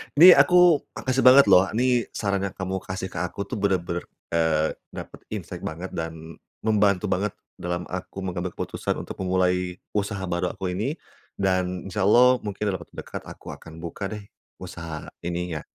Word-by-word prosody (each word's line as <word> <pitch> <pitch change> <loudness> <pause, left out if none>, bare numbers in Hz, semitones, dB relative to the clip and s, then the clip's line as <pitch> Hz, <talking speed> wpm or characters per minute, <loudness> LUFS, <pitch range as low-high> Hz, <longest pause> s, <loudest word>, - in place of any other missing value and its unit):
Ini 175 +5 +10
aku 180 -4 +6
makasih 130 -1 0
banget, 135 +2 +9
loh. 90 - +7
Ini 125 0 +2
saran 100 -2 -1
yang 100 - -4
kamu 95 0 -3
kasih 95 0 -4
ke - - -9
aku 90 - -6
tuh, 125 - -3
benar-benar, 90 -4 -1 0.2
eee, 80 -2 +2 0.2
dapat - - -8
insight - - -6
banget, 85 +4 -5
dan 80 0 -6 0.2
membantu 105 -3 +2
banget 100 +2 0 0.2
dalam 90 0 -3
aku 90 +1 -6
mengambil 90 -1 -3
keputusan - - -3
untuk - - -8
memulai 90 -1 0 0.2
usaha 105 -1 -1
baru 90 +1 -1
aku 95 -2 -4
ini. 110 +10 -1 0.5
Dan 95 -1 0
insya 100 +1 -1
Allah, 125 +5 +6
mungkin 105 -1 -6
dalam 95 -2 -2
waktu - - -27
dekat, - - -6
aku - - -10
akan 80 0 -13
buka 90 +4 -4
deh, 105 -1 -6 0.4
usaha 85 -4 -7 0.2
ininya. 85 -2 -3
95 Hz, 170 wpm, -25 LUFS, 90-105 Hz, 0.5 s, Ini